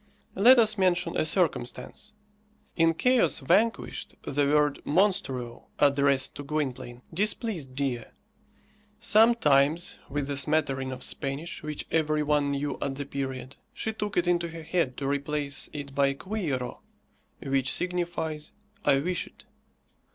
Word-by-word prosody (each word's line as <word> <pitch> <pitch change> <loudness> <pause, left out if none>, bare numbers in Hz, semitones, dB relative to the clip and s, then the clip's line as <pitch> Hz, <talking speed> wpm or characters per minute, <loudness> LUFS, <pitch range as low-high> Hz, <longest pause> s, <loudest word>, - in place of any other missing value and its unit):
Let 245 +7 +7
us 215 -3 +4
mention 175 -2 +1
a 155 - +1
circumstance. 180 - -2 0.6
In 165 -1 +3
"Chaos 250 +6 +3
Vanquished," 210 +11 0
the 140 0 +1
word 150 0 +2
monstruo, 135 - 0
addressed 140 -1 +3
to 145 - -6
Gwynplaine, 130 -4 -4
displeased 190 - -1
Dea. 130 -4 -2 0.9
Sometimes, 175 -9 +3
with 145 0 -2
the 140 0 -3
smattering 135 -2 +1
of 130 -1 -5
Spanish 145 +4 -3
which 150 -1 -4
every 155 -1 +1
one 145 -1 +1
knew 140 0 -2
at 135 -1 -2
the 140 +1 -5
period, 130 -1 -5 0.2
she 220 - -2
took 210 -1 -4
it 175 - +3
into 175 -1 +1
her 165 -1 -8
head 155 -6 -1
to 135 - -3
replace 145 0 -1
it 140 -2 -7
by 140 0 +2
quiero, 150 - -3 0.6
which 135 -1 0
signifies, 175 -4 -2 0.3
"I 135 0 +3
wish 180 +2 -2
it." - - -18
150 Hz, 135 wpm, -27 LUFS, 140-175 Hz, 0.9 s, Let